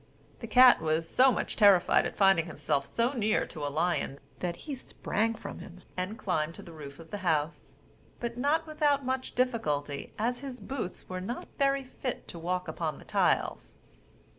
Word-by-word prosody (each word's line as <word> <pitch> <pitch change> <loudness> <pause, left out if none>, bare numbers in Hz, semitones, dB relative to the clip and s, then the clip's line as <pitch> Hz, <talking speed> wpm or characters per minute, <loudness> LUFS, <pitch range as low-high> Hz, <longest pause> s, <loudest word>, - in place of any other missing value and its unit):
The 230 - -6
cat 250 0 +7
was 160 +1 0
so 260 +8 +5
much - - -2
terrified 200 -4 +5
at - - -8
finding 195 -4 +4
himself 140 -3 -1
so 235 - 0
near 220 -4 +1
to 155 - -8
a 145 - 0
lion, 155 -2 -1 0.2
that 175 -1 -2
he 300 - -4
sprang 225 -3 -1
from - - -8
him, 180 +1 -11
and 185 +4 -3
climbed 165 -5 -1
to - - -10
the 170 - -11
roof 145 -3 -9
of 165 -1 -13
the 205 - -4
house; 160 -4 -1 0.4
but 235 -1 -3
not 295 +6 +1
without 295 -3 +1
much 260 0 -2
difficulty, 150 - -1
as 245 +3 0
his 265 -2 -7
boots 240 -10 -5
were 185 0 -4
not 235 +7 -5
very 275 0 +2
fit 255 0 -5
to 170 - -7
walk 180 +2 -2
upon 160 0 -3
the - - -14
tiles. - - 0
195 Hz, 185 wpm, -30 LUFS, 165-250 Hz, 0.4 s, cat